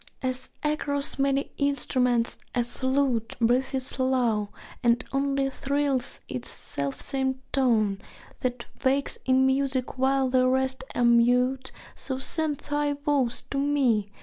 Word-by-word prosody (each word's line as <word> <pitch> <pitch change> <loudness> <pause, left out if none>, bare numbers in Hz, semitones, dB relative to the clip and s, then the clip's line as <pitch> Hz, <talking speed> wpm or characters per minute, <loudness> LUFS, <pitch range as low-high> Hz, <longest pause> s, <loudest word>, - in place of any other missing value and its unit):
As 255 0 -3
across 285 -2 -1
many 275 +1 +1
instruments 250 -4 +1 0.2
a 245 - +2
flute 260 -2 -1
Breathes 255 +3 +2
low, 245 -5 +1 0.3
and 235 +1 +2
only 275 0 +1
thrills 280 -2 -1
its 125 -1 -5
selfsame 265 - -2 0.2
tone, 220 -7 +2 0.4
That 245 -1 -3 0.2
wakes 275 +1 +1
in 260 0 +4
music 265 -1 0
while 265 0 +3
the 255 0 +3
rest 260 0 +1
are 245 - +2
mute, 250 +2 +3 0.2
So 260 - -1
send 305 +2 -1
thy 290 +1 -1
voice 285 -4 0
to 275 - 0
me! 265 -8 +2
260 Hz, 120 wpm, -26 LUFS, 245-275 Hz, 0.4 s, in